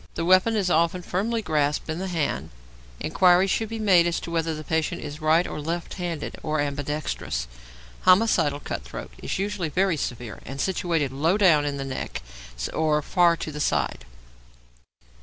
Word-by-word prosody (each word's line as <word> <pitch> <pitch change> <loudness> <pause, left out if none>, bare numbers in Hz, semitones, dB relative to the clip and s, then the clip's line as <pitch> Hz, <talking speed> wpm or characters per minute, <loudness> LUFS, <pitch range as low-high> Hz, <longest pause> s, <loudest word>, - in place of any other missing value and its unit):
The 165 - -2
weapon 185 +5 +5
is 195 -4 +1
often 170 +2 +2
firmly 220 +6 -1
grasped 150 -3 0
in 160 +1 -3
the 190 - -3
hand. 165 -5 -2 0.5
Inquiry 180 0 +4
should 215 +3 -1
be 225 - -4
made 185 -6 +4
as 170 - 0
to 170 - -7
whether 165 -1 0
the 155 - -7
patient 160 0 -1
is 150 +1 -7
right 160 +3 +4
or 150 - -5
left 165 +3 -3
handed, 175 -5 -4
or 155 -1 -1
ambidextrous. 145 - -2 0.5
Homicidal 180 -7 +4
cut - - -4
throat - - -8
is - - -3
usually 195 -4 -2
very 185 +1 +1
severe 120 -4 -5
and 135 +1 -8
situated 165 -5 0
low 160 +8 +1
down 165 -8 +5
in 145 -1 -2
the 135 - -4
neck 130 - -5 0.5
or 150 -1 +1
far 175 -1 +3
to 155 - -5
the 150 - -6
side. - - 0
165 Hz, 175 wpm, -25 LUFS, 150-185 Hz, 0.5 s, weapon